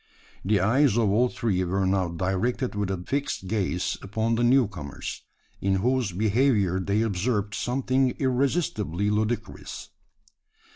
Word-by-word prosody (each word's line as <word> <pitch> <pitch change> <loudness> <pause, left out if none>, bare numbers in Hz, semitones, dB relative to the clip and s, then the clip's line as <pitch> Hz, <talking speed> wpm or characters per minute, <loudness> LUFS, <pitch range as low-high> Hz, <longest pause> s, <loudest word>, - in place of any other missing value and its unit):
The 100 +2 +2
eyes 120 +5 +3
of 110 -4 +3
all 120 +5 +3
three 95 -7 -1
were 95 +2 0
now 95 -1 +1
directed 95 +9 -1
with 105 -1 -2
a 95 - -1
fixed 140 -7 -2
gaze 95 -4 -1
upon 110 +3 -1
the 115 +1 +1
new 125 0 +5
comers, 75 -9 -7 0.4
in 100 0 +2
whose 120 +2 +1
behaviour 105 -1 +2
they 100 +4 +1
observed 105 0 -1
something 130 +3 +1
irresistibly 125 - 0
ludicrous. 110 +3 -3
105 Hz, 135 wpm, -26 LUFS, 95-125 Hz, 0.4 s, new